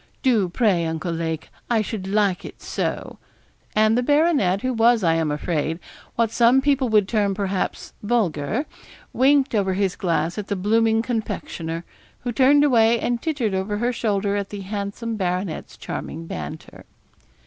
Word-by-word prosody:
Do, 225 Hz, -9 st, +3 dB
pray, 180 Hz, -5 st, +1 dB
Uncle 160 Hz, +2 st, -3 dB
Lake; 165 Hz, -1 st, -3 dB, 0.2 s
I 225 Hz, -3 st, +2 dB
should 200 Hz, -3 st, -5 dB
like 200 Hz, -2 st, +1 dB
it -, -, -10 dB
so,' -, -, -4 dB, 0.6 s
and 215 Hz, +1 st, +4 dB
the 245 Hz, -, +2 dB
baronet, 290 Hz, -, +2 dB
who 255 Hz, 0 st, 0 dB
was, 230 Hz, -1 st, +4 dB
I 165 Hz, -2 st, +4 dB
am 165 Hz, -1 st, 0 dB
afraid, 155 Hz, +1 st, -1 dB, 0.4 s
what 230 Hz, -2 st, +1 dB
some 240 Hz, +3 st, +5 dB
people 270 Hz, -2 st, +1 dB
would 210 Hz, -3 st, +3 dB
term, 205 Hz, -2 st, +1 dB
perhaps, 195 Hz, -1 st, -3 dB
vulgar, 210 Hz, -, 0 dB, 0.5 s
winked 275 Hz, +1 st, +3 dB
over 195 Hz, -3 st, +1 dB
his 195 Hz, -2 st, 0 dB
glass 170 Hz, +1 st, -1 dB
at 205 Hz, -, -5 dB
the 205 Hz, -, -1 dB
blooming 225 Hz, +3 st, +2 dB
confectioner, 185 Hz, -8 st, -4 dB, 0.4 s
who 245 Hz, -, -3 dB
turned 275 Hz, +4 st, +5 dB
away 235 Hz, -4 st, +4 dB
and 240 Hz, 0 st, -1 dB
tittered 270 Hz, -10 st, -1 dB
over 190 Hz, +2 st, -1 dB
her 240 Hz, +3 st, 0 dB
shoulder 205 Hz, -3 st, 0 dB
at 200 Hz, -1 st, -2 dB
the 205 Hz, -1 st, -6 dB
handsome 205 Hz, +3 st, -4 dB
baronet's 180 Hz, -2 st, -3 dB
charming 165 Hz, +1 st, -6 dB
banter. 160 Hz, -1 st, -8 dB
210 Hz, 160 wpm, -23 LUFS, 185-235 Hz, 0.6 s, some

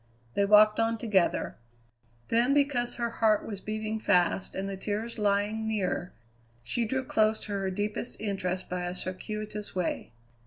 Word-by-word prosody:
They 200 Hz, -, +2 dB
walked 210 Hz, +1 st, +6 dB
on 225 Hz, 0 st, +2 dB
together. 210 Hz, -5 st, +1 dB, 0.7 s
Then, 240 Hz, +4 st, +3 dB
because 275 Hz, -4 st, +2 dB
her 235 Hz, -1 st, -2 dB
heart 220 Hz, -2 st, +2 dB
was 200 Hz, -3 st, -5 dB
beating 215 Hz, 0 st, -3 dB
fast 180 Hz, -2 st, +2 dB
and 195 Hz, +1 st, -2 dB
the 195 Hz, -, -3 dB
tears 215 Hz, +4 st, -3 dB
lying 210 Hz, +2 st, +1 dB
near, 190 Hz, -4 st, -1 dB, 0.5 s
she 230 Hz, -, 0 dB
drew 265 Hz, +4 st, -1 dB
close 215 Hz, -2 st, +2 dB
to 210 Hz, -, -5 dB
her 195 Hz, -1 st, -1 dB
deepest 205 Hz, +5 st, -3 dB
interest 185 Hz, -3 st, -2 dB
by 180 Hz, 0 st, -3 dB
a 175 Hz, -, -4 dB
circuitous 210 Hz, +3 st, -5 dB
way. 180 Hz, -2 st, -2 dB
210 Hz, 155 wpm, -29 LUFS, 195-220 Hz, 0.7 s, walked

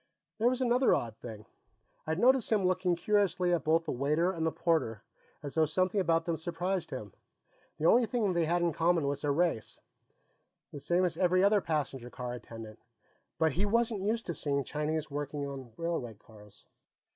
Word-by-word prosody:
There 230 Hz, -, +3 dB
was 255 Hz, +1 st, -2 dB
another 250 Hz, +1 st, +3 dB
odd 115 Hz, -2 st, -3 dB
thing. 110 Hz, -3 st, -9 dB, 0.6 s
I'd 160 Hz, 0 st, -1 dB
noticed 250 Hz, +3 st, +3 dB
him 205 Hz, -4 st, +2 dB
looking 180 Hz, -1 st, +1 dB
curiously 185 Hz, -2 st, +1 dB
at 165 Hz, -5 st, 0 dB
both 165 Hz, +1 st, +2 dB
the -, -, -2 dB
waiter 150 Hz, +7 st, +1 dB
and 165 Hz, -3 st, -4 dB
the -, -, +1 dB
porter, 135 Hz, -13 st, 0 dB, 0.4 s
as 145 Hz, -, -6 dB
though 160 Hz, -1 st, +3 dB
something 185 Hz, +5 st, +1 dB
about 165 Hz, -2 st, +1 dB
them 170 Hz, -2 st, -1 dB
surprised 175 Hz, +1 st, -3 dB
him. 105 Hz, -7 st, -7 dB, 0.6 s
The 155 Hz, -, -2 dB
only 235 Hz, +6 st, +5 dB
thing 215 Hz, -4 st, 0 dB
they 170 Hz, -1 st, +1 dB
had 175 Hz, +2 st, +1 dB
in 170 Hz, -2 st, +1 dB
common 165 Hz, 0 st, +2 dB
was 140 Hz, 0 st, -2 dB
their 145 Hz, -, 0 dB
race, 160 Hz, -6 st, -1 dB, 0.9 s
the 145 Hz, -, -7 dB
same 175 Hz, +5 st, +1 dB
as 165 Hz, -2 st, -2 dB
every 185 Hz, +1 st, +3 dB
other 205 Hz, 0 st, +4 dB
passenger 140 Hz, -7 st, -3 dB
car 125 Hz, -1 st, -6 dB
attendant. 115 Hz, -2 st, -9 dB, 0.6 s
But 160 Hz, -1 st, +2 dB
he 180 Hz, +8 st, -1 dB
wasn't 230 Hz, -1 st, +1 dB
used 225 Hz, +4 st, -1 dB
to 170 Hz, -, -3 dB
seeing 140 Hz, -3 st, -1 dB
Chinese 150 Hz, +2 st, -3 dB
working 145 Hz, 0 st, -4 dB
in 135 Hz, -4 st, -7 dB
railway 165 Hz, -10 st, -3 dB
cars. 105 Hz, -1 st, -17 dB
165 Hz, 185 wpm, -31 LUFS, 140-185 Hz, 0.9 s, only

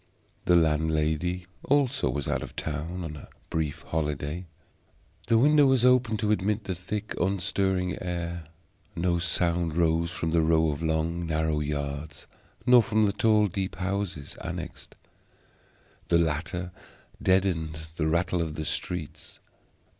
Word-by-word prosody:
The 90 Hz, -, +5 dB
landlady 80 Hz, +2 st, +1 dB, 0.2 s
also 140 Hz, -, +2 dB
was 70 Hz, +2 st, -2 dB
out -, -, 0 dB
of -, -, -8 dB
town 80 Hz, +4 st, -4 dB
on 80 Hz, -2 st, -5 dB
a 75 Hz, -, -10 dB, 0.2 s
brief 80 Hz, -1 st, -2 dB
holiday. 75 Hz, +2 st, -3 dB, 0.8 s
The 115 Hz, 0 st, +4 dB
window 145 Hz, +3 st, +6 dB
was 130 Hz, -2 st, +4 dB
open 125 Hz, -3 st, +4 dB
to 105 Hz, 0 st, 0 dB
admit 105 Hz, +1 st, +1 dB
the 95 Hz, -, -3 dB
thick 100 Hz, +4 st, -4 dB
unstirring 95 Hz, 0 st, 0 dB
air; 85 Hz, -2 st, -4 dB, 0.5 s
no 85 Hz, 0 st, +1 dB
sound 85 Hz, -1 st, 0 dB
rose 85 Hz, 0 st, +2 dB
from 85 Hz, -2 st, -2 dB
the 85 Hz, 0 st, +3 dB
row 80 Hz, 0 st, +3 dB
of 70 Hz, -, -5 dB
long 80 Hz, +1 st, -1 dB
narrow 80 Hz, -1 st, 0 dB
yards, 75 Hz, +1 st, -4 dB, 0.4 s
nor 125 Hz, -1 st, +8 dB
from 110 Hz, 0 st, +2 dB
the 100 Hz, -, +1 dB
tall 105 Hz, 0 st, +4 dB
deep 95 Hz, 0 st, -3 dB
houses 95 Hz, -6 st, -3 dB
annexed. -, -, -7 dB, 1.1 s
The 85 Hz, -, +4 dB
latter 85 Hz, +2 st, -1 dB, 0.5 s
deadened 90 Hz, -4 st, +1 dB, 0.2 s
the 75 Hz, -, +1 dB
rattle 85 Hz, +2 st, +1 dB
of 80 Hz, -2 st, -3 dB
the 80 Hz, -, -4 dB
streets. 85 Hz, -2 st, -4 dB
85 Hz, 140 wpm, -27 LUFS, 80-95 Hz, 1.1 s, nor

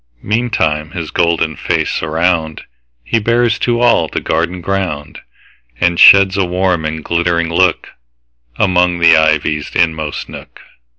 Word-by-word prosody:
Meantime 100 Hz, -9 st, -1 dB
his 85 Hz, -4 st, -6 dB
golden 85 Hz, -2 st, 0 dB
face -, -, -2 dB
aroundHe 80 Hz, 0 st, -2 dB, 0.6 s
bears 120 Hz, 0 st, +1 dB
to 120 Hz, -1 st, 0 dB
all 120 Hz, -9 st, +3 dB
the -, -, -4 dB
garden 85 Hz, +3 st, -2 dB
ground, 90 Hz, -6 st, -4 dB, 0.6 s
And 85 Hz, -1 st, 0 dB
sheds 100 Hz, -1 st, +7 dB
a 100 Hz, -, +2 dB
warm 90 Hz, -2 st, -1 dB
and 80 Hz, 0 st, -4 dB
glittering 85 Hz, -1 st, -1 dB
lookAmong 80 Hz, -, -2 dB
the 85 Hz, -1 st, +5 dB
ivy's 80 Hz, -1 st, 0 dB
inmost 80 Hz, -3 st, -1 dB
nook. -, -, -12 dB
85 Hz, 120 wpm, -14 LUFS, 80-90 Hz, 0.6 s, sheds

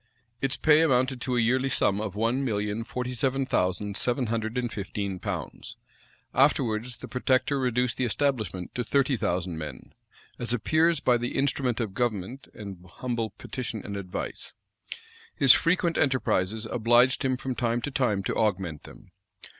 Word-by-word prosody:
Its 135 Hz, +1 st, 0 dB
pay 155 Hz, 0 st, +5 dB
amounted 130 Hz, -4 st, +2 dB
to 125 Hz, 0 st, -1 dB
a -, -, +3 dB
yearly 130 Hz, +4 st, +2 dB
sum 105 Hz, -6 st, +2 dB
of 105 Hz, -3 st, -4 dB
one 115 Hz, +5 st, 0 dB
million 105 Hz, -2 st, -1 dB
forty 125 Hz, +2 st, -4 dB
seven 135 Hz, +2 st, 0 dB
thousand 100 Hz, -3 st, 0 dB
seven 125 Hz, +3 st, +1 dB
hundred 115 Hz, +1 st, -2 dB
and 120 Hz, -3 st, -2 dB
fifteen 100 Hz, -1 st, -4 dB
pounds.[] -, -, -5 dB, 0.6 s
Afterwards 125 Hz, -4 st, +2 dB
the -, -, -9 dB
protector 130 Hz, +2 st, +1 dB
reduced 125 Hz, -1 st, 0 dB
the -, -, 0 dB
establishment 115 Hz, -7 st, -1 dB
to 125 Hz, -, -2 dB
thirty 135 Hz, +2 st, +2 dB
thousand 90 Hz, -6 st, -2 dB
men; 75 Hz, -5 st, -8 dB, 0.5 s
as 120 Hz, 0 st, -1 dB
appears 155 Hz, +6 st, +2 dB
by 125 Hz, -1 st, +4 dB
the 120 Hz, +1 st, -3 dB
"instrument 135 Hz, -3 st, 0 dB
of 110 Hz, -5 st, -2 dB
government 120 Hz, +2 st, -2 dB
and 100 Hz, -4 st, -8 dB
humble 120 Hz, -3 st, -2 dB
petition 115 Hz, -4 st, -6 dB
and 100 Hz, -, -5 dB
advice." 95 Hz, -2 st, -6 dB, 0.8 s
His 135 Hz, -2 st, +8 dB
frequent 170 Hz, 0 st, +2 dB
enterprises 110 Hz, -6 st, +1 dB
obliged 120 Hz, +4 st, +3 dB
him 130 Hz, -1 st, +1 dB
from 130 Hz, 0 st, -3 dB
time 120 Hz, -1 st, 0 dB
to 145 Hz, -, -3 dB
time 125 Hz, -8 st, +1 dB
to -, -, -1 dB
augment 95 Hz, -8 st, -1 dB
them. -, -, -14 dB
120 Hz, 160 wpm, -27 LUFS, 105-130 Hz, 0.8 s, His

